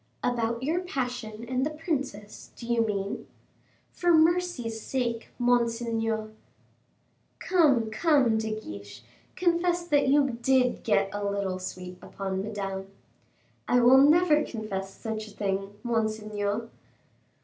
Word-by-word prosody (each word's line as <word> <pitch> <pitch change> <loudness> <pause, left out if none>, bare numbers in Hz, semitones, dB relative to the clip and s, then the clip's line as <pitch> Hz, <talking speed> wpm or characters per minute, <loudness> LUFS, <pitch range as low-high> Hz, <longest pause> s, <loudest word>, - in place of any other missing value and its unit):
"About 235 -1 0
your 320 +6 +1
passion 245 -9 -4
and 255 +1 0
the 295 - +1
princess, 275 - -4
do 235 - -9
you 235 0 +2
mean?" 200 -2 -3 0.6
"For 350 -1 +1
mercy's 320 -9 +2
sake, 235 -3 -2
monseigneur." 230 -2 0 1.1
"Come, 280 -12 +3
come, 260 -4 +3
De 220 0 -2
Guiche, 105 - -10 0.3
confess 345 0 +1
that 290 -4 +3
you 275 -3 +3
did 255 0 +2
get 195 -3 +1
a 205 0 -3
little 200 -2 -1
sweet 180 0 -7
upon 190 -1 -4
Madame." 195 -2 -4 0.8
"I 245 - +4
will 250 +2 +7
never 305 +2 +5
confess 200 -6 -5
such 220 +1 -5
a 210 - -14
thing, 195 0 -2
monseigneur." 215 -2 -1
230 Hz, 120 wpm, -27 LUFS, 205-275 Hz, 1.1 s, will